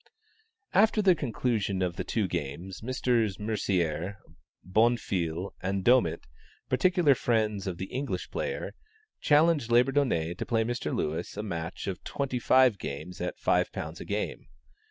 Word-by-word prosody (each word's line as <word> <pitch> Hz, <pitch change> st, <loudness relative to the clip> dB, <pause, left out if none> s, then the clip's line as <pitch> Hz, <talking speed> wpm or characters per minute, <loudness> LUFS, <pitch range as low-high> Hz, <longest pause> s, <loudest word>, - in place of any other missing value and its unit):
After 215 Hz, +2 st, +4 dB
the 195 Hz, -3 st, +6 dB
conclusion 115 Hz, -, -1 dB
of 90 Hz, -1 st, -1 dB
the -, -, -3 dB
two 110 Hz, -4 st, -1 dB
games, 85 Hz, +3 st, -5 dB
Messrs. 115 Hz, -4 st, 0 dB
Mercier, 95 Hz, -4 st, -1 dB, 0.5 s
Bonfil 95 Hz, -4 st, 0 dB
and 95 Hz, 0 st, -1 dB
Domit, 125 Hz, +1 st, +4 dB, 0.5 s
particular 170 Hz, +3 st, +4 dB
friends 110 Hz, -5 st, 0 dB
of 90 Hz, -2 st, -3 dB
the 95 Hz, -, -4 dB
English 135 Hz, +3 st, -3 dB
player, -, -, -3 dB, 0.5 s
challenged 150 Hz, -4 st, +3 dB
Labourdonnais 120 Hz, -, +2 dB
to -, -, -2 dB
play 115 Hz, -1 st, +2 dB
Mr. 120 Hz, +2 st, -3 dB
Lewis 75 Hz, +2 st, -3 dB
a 105 Hz, -, -3 dB
match 85 Hz, -4 st, -5 dB
of 95 Hz, -2 st, -4 dB
twenty 135 Hz, -3 st, -2 dB
five 125 Hz, -4 st, +4 dB
games 75 Hz, +6 st, -6 dB
at -, -, -3 dB
£5 -, -, -1 dB
a -, -, -7 dB
game. -, -, -3 dB
110 Hz, 135 wpm, -28 LUFS, 90-130 Hz, 0.5 s, the